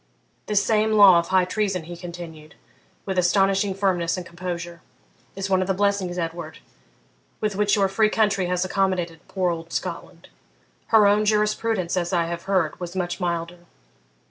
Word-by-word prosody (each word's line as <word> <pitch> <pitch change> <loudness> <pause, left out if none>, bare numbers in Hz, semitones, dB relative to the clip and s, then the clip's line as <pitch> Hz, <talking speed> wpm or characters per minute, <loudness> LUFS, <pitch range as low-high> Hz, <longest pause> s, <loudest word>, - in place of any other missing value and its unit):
This 210 -1 +2
same 220 0 +2
law 200 -5 +8
of 170 - -3
high 185 -1 +3
treason,' 195 -2 -1
he 175 +2 -8
continued, 170 -3 -10 0.5
with 190 -2 -1
astonishing 195 +2 +2
firmness 185 -3 0
and 180 - -6
composure, 175 -1 -6 0.5
'is 195 0 -3
one 190 -1 +2
of 185 - -2
the 190 - 0
blessings, 200 -2 0
Edward, 165 -2 -5 0.8
with 210 -2 -1
which 205 0 +2
your 200 -2 +2
free 215 +3 +2
country 205 -4 +1
has 180 +1 0
accommodated 185 -3 -1
poor 185 -2 0
old 165 0 -6
Scotland; - - -6 0.6
her 220 -2 +5
own 205 +1 +4
jurisprudence, 210 -3 0
as 175 0 -1
I 170 -2 +2
have 170 0 -5
heard, 180 -6 +1
was 175 0 -6
much 180 0 -2
milder. 170 -1 -3
185 Hz, 165 wpm, -23 LUFS, 175-200 Hz, 0.8 s, law